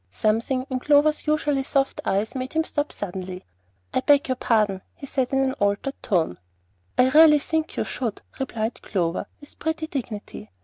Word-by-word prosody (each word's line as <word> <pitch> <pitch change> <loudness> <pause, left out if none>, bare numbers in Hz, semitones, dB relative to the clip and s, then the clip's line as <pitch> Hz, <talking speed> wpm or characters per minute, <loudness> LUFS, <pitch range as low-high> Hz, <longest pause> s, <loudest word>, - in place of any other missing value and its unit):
Something 230 - 0
in 260 -1 -2
Clover's 300 +3 +3
usually 295 -2 +1
soft 270 0 0
eyes 200 +3 0
made 260 0 -4
him 320 0 +2
stop 295 -2 -2
suddenly. 185 -1 -6 0.5
"I - - +3
beg 285 0 +4
your 255 - +2
pardon," 210 -6 +1
he 280 - -9
said 260 -2 -1
in 270 - +2
an 265 -1 +2
altered 205 +7 0
tone. 165 - 0 0.6
"I 255 +1 +5
really 305 +1 +8
think 315 +2 -2
you - - +1
should," 230 -5 -4 0.2
replied 230 -4 -3
Clover, 175 -3 -1
with 290 - -15
pretty 320 0 -2
dignity. 235 - -6
260 Hz, 170 wpm, -24 LUFS, 210-290 Hz, 0.6 s, really